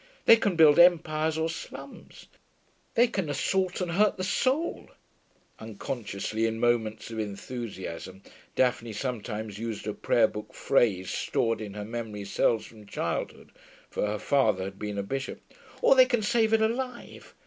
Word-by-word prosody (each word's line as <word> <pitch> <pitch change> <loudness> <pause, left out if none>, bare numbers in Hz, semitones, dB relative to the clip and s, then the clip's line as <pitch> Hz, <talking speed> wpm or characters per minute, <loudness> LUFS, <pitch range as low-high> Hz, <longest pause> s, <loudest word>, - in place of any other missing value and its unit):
They 230 - +9
can 205 -5 0
build 155 -1 +6
empires 160 -3 +4
or 160 0 +1
slums; 165 - -9 0.7
they 240 0 +6
can 195 -9 -2
assault 185 +6 0
and 180 -1 -2
hurt 205 +4 +3
the 185 - -3
soul' 265 - 0 0.7
(unconsciously 110 0 -3
in 115 0 -3
moments 115 -2 0
of 110 - -5
enthusiasm, 100 -4 -6 0.3
Daphne 120 -3 +1
sometimes 110 -3 -4
used 115 -2 -4
a - - -2
prayer - - +3
book - - -9
phrase 95 -6 +1
stored 115 -1 0
in 105 -2 -7
her 105 -1 -5
memory 110 -2 -5
cells 110 +3 +1
from 105 -3 -14
childhood, - - -4 0.4
for - - -1
her 105 +1 -2
father 110 -5 +2
had 95 +1 -7
been 105 -1 -4
a 100 - -1
bishop), 135 +6 -4 0.4
'or - - +7
they 260 -1 +7
can 240 -4 0
save 220 +1 +2
it 220 0 +4
alive. 245 +2 -4
120 Hz, 155 wpm, -28 LUFS, 105-180 Hz, 0.7 s, They